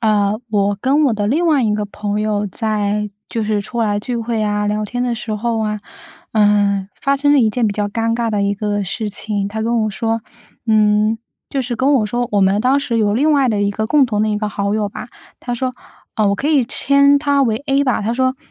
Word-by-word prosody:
呃， 210 -2 +2 0.2
我 205 -1 +1
跟 280 +7 +2
我 255 -6 +2
的 205 -1 -1
另 310 +10 +1
外 300 -5 +3
一 215 -2 +1
个 210 0 -2
朋 205 0 -3
友 210 -1 0
在 210 0 -1 0.2
就 230 - -2
是 210 -1 0
出 235 +3 -4
来 205 -2 +1
聚 245 +4 -4
会 230 -1 -2
啊、 210 0 0
聊 210 +1 -1
天 245 +4 -3
的 245 -1 0
时 225 -1 -4
候 225 +1 -1
啊， 210 -1 -2 0.5
呃， 205 -2 +2
发 275 0 +1
生 285 +1 +2
了 290 - +5
一 225 - +3
件 230 +1 0
比 205 - 0
较 205 0 -2
尴 225 +2 -1
尬 235 -1 -1
的 210 -2 0
一 200 0 +1
个 205 0 -2
事 210 +3 -3
情。 205 -1 -3
他 220 +1 -4
跟 230 +1 +1
我 215 - 0
说， 225 +2 -2 0.5
嗯， 215 0 +3 0.3
就 275 - -1
是 245 -1 -3
跟 265 +4 +2
我 240 -6 +3
说 240 +3 -2
我 205 - +3
们 195 +2 +3
当 260 +4 +3
时 240 -4 -1
有 205 -2 +2
另 295 +7 +3
外 275 -3 +3
的 210 -3 +1
一 200 - +1
个 220 +2 -2
共 290 +3 +4
同 215 -4 -1
的 215 - +1
一 210 - 0
个 210 0 -2
好 200 0 -1
友 210 -2 -1
吧， - - -7 0.3
他 245 - -3
说 255 +1 -2 0.4
呃， 215 -2 +3
我 200 - +2
可 280 - -2
以 280 -6 +3
称 280 +2 +3
他 280 -1 +2
为 225 -4 +1
A 275 -1 +2
吧。 255 -6 0
他 220 +3 -1
说 260 +1 0
220 Hz, 265 characters per minute, -18 LUFS, 210-250 Hz, 0.5 s, 了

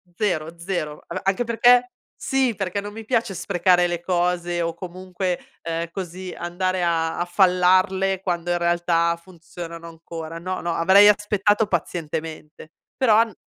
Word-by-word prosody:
zero, 170 -5 -2
zero. 170 -4 -4
A - - -4
anche 195 +5 +1
perché 245 +2 +4 0.3
sì, 265 -4 +1
perché 195 +1 -2
non 205 0 -7
mi 225 0 -9
piace 225 -5 0
sprecare 180 -1 +2
le 175 -1 -1
cose 175 -1 0
o 165 0 -2
comunque, 180 +1 -4 0.2
ehm, 165 0 -3
così 185 0 -6
andare 185 +1 -2
a 165 0 0
fallarle 185 +1 +3
quando 175 -2 -2
in 175 - +2
realtà 170 -1 +1
funzionano 170 -1 -10
ancora. 165 0 -8
No, 185 +2 -4
no, 170 -1 -2
avrei 190 +4 +6
aspettato 210 +1 +2
pazientemente. 160 -3 -4 0.3
Però 235 -5 +4
an 225 0 +3
180 Hz, 145 wpm, -23 LUFS, 170-195 Hz, 0.3 s, avrei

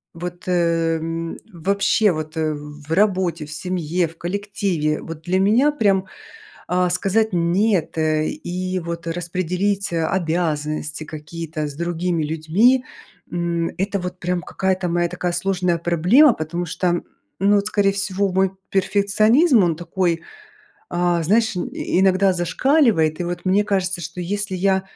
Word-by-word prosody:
Вот, 175 +1 -6
эм, 165 -1 0
вообще 200 +4 +2
вот, 155 -1 -5
э, 155 -1 0
в 150 +1 -10
работе, 185 -4 +1
в 150 - -11
семье, 175 0 -1
в 165 - -15
коллективе. 175 -4 -2
Вот 165 -1 -8
для 185 +2 +1
меня, 235 +10 +4
прям, 200 -8 +2 0.6
а, 180 0 +1
сказать 200 +4 +1
"нет", 175 +1 +1
э, 155 -1 +1
и, 185 - -3
вот, 170 0 -6
распределить 180 +3 -2
обязанности 160 -3 -1
какие-то 155 0 -6
с 145 - -8
другими 170 0 -1
людьми, 165 +12 +2 0.5
м, 170 -1 -1
это 200 +1 -1
вот 180 0 -5
прям 180 0 -1
какая-то 190 0 -1
моя 175 0 +1
такая 180 0 -3
сложная 180 -1 0
проблема. 180 - +5
Потому 170 +2 -4
что, 175 +1 -1 0.4
ну 200 +2 +4
вот, 200 +1 0
скорее 200 -2 +2
всего, 195 0 -1
мой 190 +1 +2 0.2
перфекционизм, 210 - +3
он 170 -2 +1
такой, 170 0 -1 0.7
а, 175 -1 +1
знаешь, 215 +3 +2
и 175 - -2
иногда 190 0 +4
зашкаливает. 180 - +2
И - - 0
вот 175 0 -4
мне 195 +2 +3
кажется, 190 -3 -1
что 165 +2 -6
если 200 +2 -3
я, 190 +1 +2
180 Hz, 140 wpm, -21 LUFS, 165-195 Hz, 0.7 s, проблема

